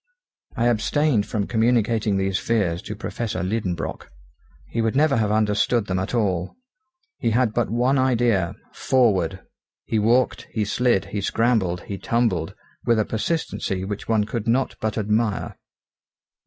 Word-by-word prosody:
I 115 - +1
abstained 120 +1 +2
from 105 -3 -1
communicating 110 -2 +1
these 95 0 0
fears 100 -7 0
to 105 - -6
Professor 110 -3 -4
Liedenbrock. 95 -4 -3 0.6
He 115 - -2
would 115 +1 0
never 145 0 +3
have 105 -2 +1
understood 105 +1 +2
them 95 -2 -1
at 95 +6 -3
all. 95 -6 0 0.6
He - - +1
had 115 0 +2
but 120 0 0
one 125 +4 +2
idea 120 -8 +2 0.2
forward! 95 -8 +1 0.4
He 110 - 0
walked, 120 +4 +2
he 110 -2 -1
slid, 120 -1 +1
he 105 - -1
scrambled, 100 -5 +1
he 100 +1 -6
tumbled, 115 -10 0 0.3
with 115 - +2
a 110 - +2
persistency 110 - -2
which 105 +1 -5
one 110 -2 +3
could 110 +1 -4
not 130 +3 +1
but 110 0 -2
admire. 105 0 0
110 Hz, 145 wpm, -23 LUFS, 100-120 Hz, 0.6 s, never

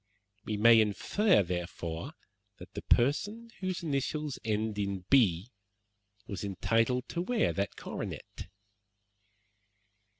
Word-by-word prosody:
We 105 - -2
may 115 +1 +7
infer, 110 - +2
therefore, 85 -2 -4 0.4
that - - -13
the - - -5
person 205 - +1
whose 185 -2 -3
initials 150 -1 -2
end 110 -1 -1
in 100 -2 -2
B 110 -5 +4 0.7
was 100 -3 -6
entitled 115 +6 0
to 170 - -2
wear 225 +4 +1
that 100 0 -2
coronet." - - -7
115 Hz, 105 wpm, -30 LUFS, 100-150 Hz, 0.7 s, may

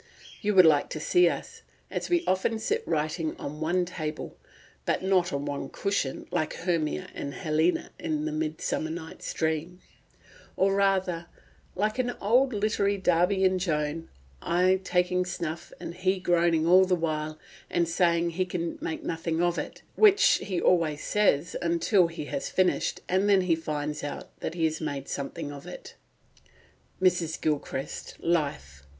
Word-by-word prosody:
You 210 -2 0
would 185 -2 +9
like 150 -3 +4
to - - -4
see 175 +3 +4
us, - - -6 0.3
as - - -3
we 350 -1 +2
often 190 +4 +1
sit 435 - -1
writing 155 +1 -1
on 150 +2 -6
one 175 +3 +1
table 155 -3 -5 0.5
(but - - 0
not 185 -2 +2
on 140 0 -2
one 145 -1 -4
cushion 200 -10 -1
sitting, - - -15
like 155 - -1
Hermia 160 - -1
and 140 -1 -5
Helena 160 +4 0
in 155 -2 -2
the 155 - -2
Midsummer 155 0 -2
Nights 160 0 -6
Dream); 160 +3 -2 0.8
or 195 +1 +3
rather, 190 -4 +1 0.5
like 210 +5 0
an 245 -1 0
old 250 +6 +3
literary 205 -2 +1
Darby 190 +1 +2
and 185 0 +3
Joan, 155 -2 -2 0.3
I 185 +2 +2
taking 180 0 +1
snuff, 170 -3 -5
and 170 - -6
he 185 +2 0
groaning 170 -3 +2
all 185 +2 +7
the 185 -1 +2
while 155 -2 -2 0.3
and 170 -1 +1
saying 170 0 +2
he 185 +2 0
can 170 -2 -3
make 160 - -4
nothing 165 0 -2
of 175 0 +1
it, - - -7
which 415 -1 +6
he 185 -4 -2
always 160 -5 +2
says 180 -7 +2 0.3
till 190 -5 +4
he 165 -3 -6
has 275 - -3
finished, 185 -1 +1
and 190 +3 +2
then 195 -2 +5
he 180 -3 +2
finds 150 -2 -4
out 145 - -6
that 160 - -4
he 165 -2 +1
has 160 +1 -1
made 140 -3 -4
something 145 +2 -4
of 140 -1 -10
it" - - -9 1.1
(Mrs. 175 -3 +1
Gilchrist's 145 -3 -3
Life, 140 - -1
p. 70 - -26
170 Hz, 165 wpm, -27 LUFS, 155-185 Hz, 1.1 s, would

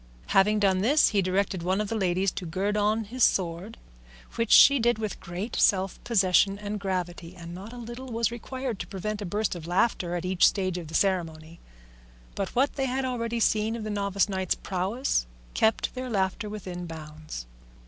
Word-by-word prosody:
Having 210 +2 +4
done 190 -2 +3
this, 275 +10 +4
he 200 - +2
directed 190 0 0
one 185 +3 0
of 210 - -1
the 225 - -3
ladies 190 -2 +1
to 180 - -6
gird 195 +5 -1
on 210 +2 +1
his 240 +4 -2
sword, 185 +4 0 0.6
which 230 -1 -1
she 280 -1 +8
did 240 -1 +2
with 215 -3 -4
great 180 +7 -5
self 190 -1 +2
possession 195 -2 +3
and 210 0 -4
gravity, 180 -2 -4
and 170 -1 -9
not 195 +5 -8
a 245 - -9
little 240 +2 -8
was 230 -2 0
required 245 -1 -5
to - - -5
prevent 210 +2 -4
a 200 - -4
burst 210 +3 -1
of 170 -2 -8
laughter 175 -1 +1
at 175 0 -3
each 185 -1 +4
stage 185 -3 -1
of 165 - -8
the 160 - -7
ceremony; 165 -4 -1 0.7
but 195 -2 -3
what 270 +4 +1
they 270 - +1
had 260 +1 -1
already 235 -2 -2
seen 220 0 +2
of 230 - -5
the 215 - -4
novice 200 -1 +1
knight's 190 -3 -1
prowess 190 - -1 0.3
kept 220 0 +1
their 255 0 -5
laughter 195 0 -1
within 180 -4 -6
bounds. 155 - -8
200 Hz, 190 wpm, -27 LUFS, 180-225 Hz, 0.7 s, she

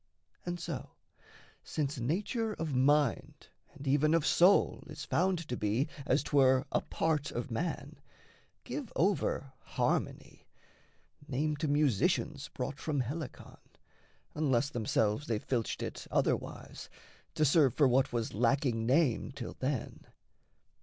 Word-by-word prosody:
And 175 0 -3
so, 165 -6 -6 0.7
since 145 -3 -3
nature 210 - -1
of 160 -6 -4
mind 145 +2 +1 0.3
And 140 -1 -9
even 150 +4 +3
of 165 -2 +1
soul 180 +4 +4
is - - -7
found 180 -3 0
to 125 - -2
be, 110 +7 0 0.2
as - - +2
'twere, 130 -2 +4
A - - +1
part 155 -3 -1
of 120 +1 -5
man, 165 +9 -3 0.7
give 280 -7 -5
over 160 -7 0
"harmony" - - -2 0.8
Name 150 +3 0
to 155 +1 -1
musicians 145 - +1
brought 135 -1 -5
from 145 -4 -1
Helicon, 140 +4 -6 0.7
Unless 140 -2 +1
themselves 110 +1 0
they 115 - 0
filched 115 +1 -2
it - - -6
otherwise, - - -2 0.5
To 155 - +3
serve 145 -3 +4
for 145 - +5
what 130 +2 +2
was 115 -2 -2
lacking 115 0 +1
name 135 -2 +2
till 130 -4 -7
then. 130 -2 -3
140 Hz, 125 wpm, -32 LUFS, 125-155 Hz, 0.8 s, for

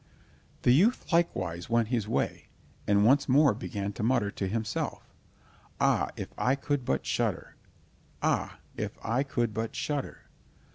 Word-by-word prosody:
The 125 - +5
youth 195 - +3
likewise 95 - 0
went 115 -1 +2
his 115 -5 0
way, 115 - -1 0.4
and 100 0 +4
once 140 +4 +4
more 140 0 +5
began 100 -3 -4
to - - -6
mutter 110 -3 +2
to 95 - -3
himself: 110 +2 -3 0.7
"Ah, - - +2
if - - -5
I 125 +2 +3
could 140 -2 -2
but 65 - 0
shudder! - - -1 0.7
Ah, - - 0 0.2
if - - -4
I 120 +4 +1
could 120 -5 -1
but 110 +1 -3
shudder!" 145 -2 -3
120 Hz, 145 wpm, -29 LUFS, 105-140 Hz, 0.7 s, The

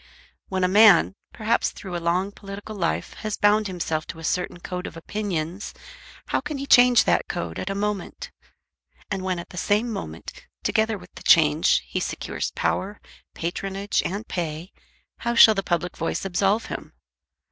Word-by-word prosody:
When 190 -1 -1
a - - +4
man, 200 -2 +6 0.2
perhaps 220 +2 +1
through 185 -3 -8
a 170 - -3
long 180 +4 0
political 205 +1 -9
life, 170 -4 -2
has 215 -1 -3
bound 210 +1 +3
himself 165 -4 -3
to - - -7
a 165 - -10
certain 175 +1 -2
code 180 +1 -5
of - - -9
opinions, 180 -1 -4 0.5
how - - +1
can 295 +1 -5
he 275 - -4
change 245 -3 +7
that - - +1
code 85 -1 -4
at 185 - -4
a 195 - -2
moment? 205 0 -3 0.8
And 195 -1 -1
when 185 -1 -1
at 170 - -7
the 180 - -11
same 210 +6 +1
moment, 80 - -8 0.2
together 220 0 +1
with 180 -1 -15
the - - -11
change, 155 -1 +5
he - - -3
secures - - -3
power, 205 +2 -1 0.4
patronage, 195 +4 -2
and 205 +5 -4
pay, 165 0 -4 0.5
how 235 0 -1
shall 220 -1 +9
the 195 - -1
public 175 -1 -2
voice 165 +3 -2
absolve 195 +4 +1
him? - - -7
195 Hz, 170 wpm, -24 LUFS, 175-210 Hz, 0.8 s, shall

